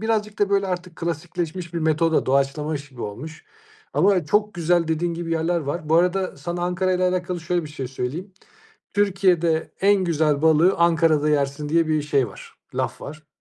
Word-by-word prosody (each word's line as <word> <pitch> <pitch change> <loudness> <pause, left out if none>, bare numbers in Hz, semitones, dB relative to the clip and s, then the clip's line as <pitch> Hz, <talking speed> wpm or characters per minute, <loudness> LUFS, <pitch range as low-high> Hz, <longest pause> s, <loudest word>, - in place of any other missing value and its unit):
birazcık 215 -1 -1
da, 205 -1 +1
böyle, 200 -1 +2
artık 180 -2 -5
klasikleşmiş 170 +1 -4
bir - - 0
metoda 160 0 +1
doğaçlamış 140 +2 0
gibi 125 -3 -10
olmuş. 135 +11 -7 0.5
Ama 190 -4 +3
çok 210 +5 +1
güzel 170 -1 +1
dediğin 165 +1 0
gibi 165 0 -5
yerler 165 +2 +1
var. 150 +2 -4
Bu 160 - +3
arada 180 +1 +1
sana 175 +5 -4
Ankara'yla 180 +1 +1
alakalı 180 -1 -2
şöyle 175 0 -1
bir - - -8
şey 135 -4 -6
söyleyeyim. 150 +9 -5 0.6
"Türkiye'de 180 -5 +1
en 195 -1 +4
güzel 155 -3 +1
balığı 160 +4 +5
Ankara'da 165 -3 +3
yersin." 145 0 0
diye 165 +1 +2
bir 155 -1 +1
şey 140 -4 +1
var, 100 - -13 0.2
laf - - -2
var. 155 +1 -9
165 Hz, 170 wpm, -23 LUFS, 150-180 Hz, 0.6 s, balığı